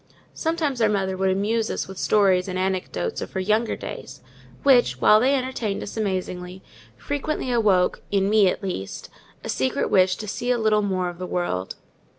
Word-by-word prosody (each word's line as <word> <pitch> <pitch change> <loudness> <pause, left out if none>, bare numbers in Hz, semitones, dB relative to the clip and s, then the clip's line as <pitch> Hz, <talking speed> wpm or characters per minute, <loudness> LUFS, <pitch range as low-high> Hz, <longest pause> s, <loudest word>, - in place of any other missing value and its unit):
Sometimes 315 -6 -1
our 220 - +4
mother 195 -2 0
would 190 0 +1
amuse 215 +4 0
us - - -3
with 190 -1 -9
stories 195 -3 +3
and 185 -1 -3
anecdotes 185 - -2
of - - -7
her 190 - -2
younger 215 +4 +1
days, - - -8 0.4
which, 260 -3 +4
while 215 - +6
they 265 +5 +3
entertained 255 -6 -2
us - - -8
amazingly, 185 -3 -3 0.3
frequently 290 -2 -3
awoke—in 195 -3 +2
me, 210 -1 +4
at 200 - -4
least—a 140 - -7
secret 130 0 -1
wish 185 -1 +4
to 215 - -7
see 240 +4 -3
a 250 - +3
little 215 -2 +2
more 185 -3 -1
of 175 0 -7
the 185 - -4
world. 95 - -2
200 Hz, 170 wpm, -23 LUFS, 185-225 Hz, 0.4 s, while